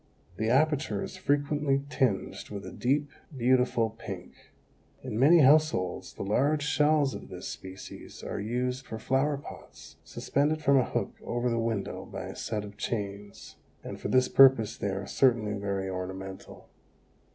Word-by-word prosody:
The 110 Hz, +1 st, 0 dB
aperture 140 Hz, -5 st, +2 dB
is -, -, -7 dB
frequently 145 Hz, -1 st, +1 dB
tinged 130 Hz, -7 st, -1 dB
with 100 Hz, -1 st, -6 dB
a -, -, -7 dB
deep, 140 Hz, +3 st, 0 dB, 0.3 s
beautiful 125 Hz, -2 st, +2 dB
pink. 115 Hz, -, -8 dB, 0.7 s
In 120 Hz, -4 st, -3 dB
many 160 Hz, +6 st, +7 dB
households 145 Hz, -, +3 dB
the -, -, -5 dB
large 140 Hz, +9 st, +1 dB
shells 150 Hz, -1 st, +2 dB
of -, -, -8 dB
this -, -, -7 dB
species 95 Hz, 0 st, -9 dB
are -, -, -4 dB
used 125 Hz, +4 st, -2 dB
for 110 Hz, -, -5 dB
flower 135 Hz, +5 st, +1 dB
pots, 140 Hz, -, -12 dB
suspended 150 Hz, +2 st, 0 dB
from 140 Hz, -1 st, +5 dB
a 125 Hz, -, +2 dB
hook -, -, -2 dB
over 120 Hz, +1 st, -1 dB
the 115 Hz, -, 0 dB
window 115 Hz, -3 st, -2 dB
by -, -, -6 dB
a -, -, -7 dB
set 105 Hz, -2 st, -3 dB
of 100 Hz, 0 st, -11 dB
chains, 100 Hz, -2 st, -5 dB, 0.3 s
and -, -, -7 dB
for -, -, -3 dB
this 130 Hz, 0 st, +3 dB
purpose 130 Hz, -6 st, +6 dB
they 100 Hz, -, -2 dB
are 95 Hz, 0 st, -3 dB
certainly 115 Hz, -3 st, +2 dB
very 100 Hz, -1 st, -2 dB
ornamental. 95 Hz, +1 st, -7 dB
125 Hz, 155 wpm, -29 LUFS, 105-140 Hz, 0.7 s, many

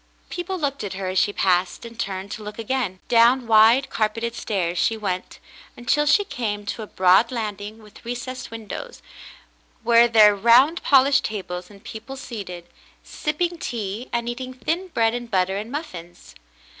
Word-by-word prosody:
People 355 Hz, +2 st, -4 dB
looked 280 Hz, -6 st, -2 dB
at 200 Hz, -, -4 dB
her 190 Hz, -1 st, -4 dB
as 185 Hz, 0 st, +1 dB
she -, -, +2 dB
passed, 185 Hz, 0 st, 0 dB
and 230 Hz, 0 st, -11 dB
turned 195 Hz, -2 st, -4 dB
to 215 Hz, -, -6 dB
look 210 Hz, 0 st, -8 dB
again. 230 Hz, -5 st, -2 dB
Down 240 Hz, +2 st, +4 dB
wade, 225 Hz, +4 st, +5 dB
carpeted 225 Hz, +2 st, -1 dB
stairs 180 Hz, -7 st, -2 dB
she 225 Hz, -, +1 dB
went, 185 Hz, -4 st, -4 dB, 0.4 s
until 295 Hz, +5 st, +1 dB
she 410 Hz, -, +5 dB
came 225 Hz, -, -4 dB
to 205 Hz, -, -4 dB
a 215 Hz, -, -7 dB
broad 190 Hz, +6 st, +4 dB
landing 215 Hz, -2 st, -5 dB
with 210 Hz, -, -16 dB
recessed 250 Hz, +2 st, -6 dB
windows, 230 Hz, -, -8 dB, 0.8 s
where 235 Hz, 0 st, +5 dB
were 215 Hz, -2 st, +6 dB
round 245 Hz, -, +5 dB
polished 275 Hz, 0 st, +4 dB
tables 180 Hz, -4 st, -5 dB
and 200 Hz, -1 st, -16 dB
people 230 Hz, +5 st, -8 dB
seated, 195 Hz, -9 st, -7 dB, 0.4 s
sipping 340 Hz, +3 st, -2 dB
tea 225 Hz, -1 st, -4 dB
and 235 Hz, 0 st, -2 dB
eating 255 Hz, +1 st, -5 dB
thin 325 Hz, +10 st, -2 dB
bread 230 Hz, -9 st, +1 dB
and 240 Hz, -1 st, -5 dB
butter 190 Hz, -2 st, +1 dB
and 215 Hz, +3 st, -6 dB
muffins. 175 Hz, -, -8 dB
225 Hz, 165 wpm, -23 LUFS, 200-255 Hz, 0.8 s, were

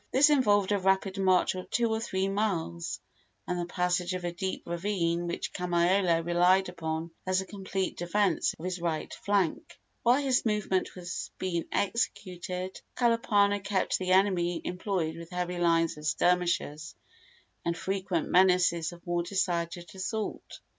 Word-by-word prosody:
This 285 Hz, +3 st, +5 dB
involved 205 Hz, -8 st, +3 dB
a 205 Hz, -, +2 dB
rapid 190 Hz, +1 st, +1 dB
march 185 Hz, -1 st, +3 dB
of 185 Hz, -1 st, -7 dB
two 235 Hz, 0 st, +2 dB
or 220 Hz, -, 0 dB
three 190 Hz, -4 st, -1 dB
miles, 190 Hz, -, -2 dB, 0.5 s
and 180 Hz, 0 st, -1 dB
the 175 Hz, -, -3 dB
passage 180 Hz, 0 st, 0 dB
of 180 Hz, -, -5 dB
a 175 Hz, -, -1 dB
deep 190 Hz, +2 st, -3 dB
ravine 170 Hz, -1 st, -1 dB
which 170 Hz, -, -4 dB
Kamaiole 175 Hz, -1 st, +2 dB
relied 180 Hz, +2 st, +3 dB
upon 165 Hz, -1 st, -4 dB, 0.2 s
as 185 Hz, 0 st, +2 dB
a 190 Hz, -, -3 dB
complete 190 Hz, -1 st, -3 dB
defence 175 Hz, 0 st, +1 dB
of 165 Hz, -, -8 dB
his 185 Hz, -1 st, -3 dB
right 165 Hz, -2 st, -2 dB
flank. 200 Hz, -4 st, -1 dB, 0.2 s
While 250 Hz, +4 st, +3 dB
this 260 Hz, -3 st, +2 dB
movement 210 Hz, -4 st, 0 dB
was 175 Hz, -1 st, -5 dB
being 170 Hz, -3 st, -2 dB
executed 185 Hz, -3 st, -2 dB, 0.2 s
Kalapana 210 Hz, -4 st, +3 dB
kept 195 Hz, -1 st, 0 dB
the 185 Hz, -1 st, -3 dB
enemy 180 Hz, -3 st, +3 dB
employed 180 Hz, -3 st, -2 dB
with 165 Hz, 0 st, -9 dB
heavy 180 Hz, 0 st, -3 dB
lines 165 Hz, -1 st, +2 dB
of 150 Hz, -, -5 dB
skirmishers 170 Hz, -3 st, 0 dB, 0.7 s
and 170 Hz, 0 st, -1 dB
frequent 190 Hz, -3 st, -2 dB
menaces 180 Hz, -3 st, +3 dB
of 175 Hz, 0 st, -14 dB
more 175 Hz, 0 st, 0 dB
decided 175 Hz, -2 st, -2 dB
assault. 200 Hz, +3 st, -4 dB
180 Hz, 150 wpm, -29 LUFS, 170-195 Hz, 0.7 s, This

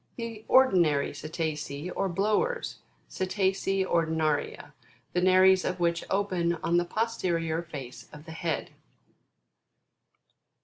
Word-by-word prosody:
The 230 Hz, -2 st, -6 dB
ORDINARY 175 Hz, -, +4 dB
CETACEA, 155 Hz, +1 st, -4 dB
or 195 Hz, -, 0 dB
BLOWERS, 215 Hz, -, 0 dB, 0.3 s
Cetacea 190 Hz, 0 st, 0 dB
Ordinaria, 160 Hz, -4 st, -1 dB, 0.4 s
the 180 Hz, -, +1 dB
nares 185 Hz, 0 st, +5 dB
of 185 Hz, 0 st, -2 dB
which 170 Hz, 0 st, +1 dB
open 185 Hz, -4 st, 0 dB
on 170 Hz, +1 st, +2 dB
the 175 Hz, -, +2 dB
posterior 170 Hz, -6 st, -1 dB
face 140 Hz, -7 st, -9 dB
of 150 Hz, +1 st, -12 dB
the 160 Hz, -, -9 dB
head. 160 Hz, -1 st, -3 dB
175 Hz, 105 wpm, -28 LUFS, 160-195 Hz, 0.4 s, nares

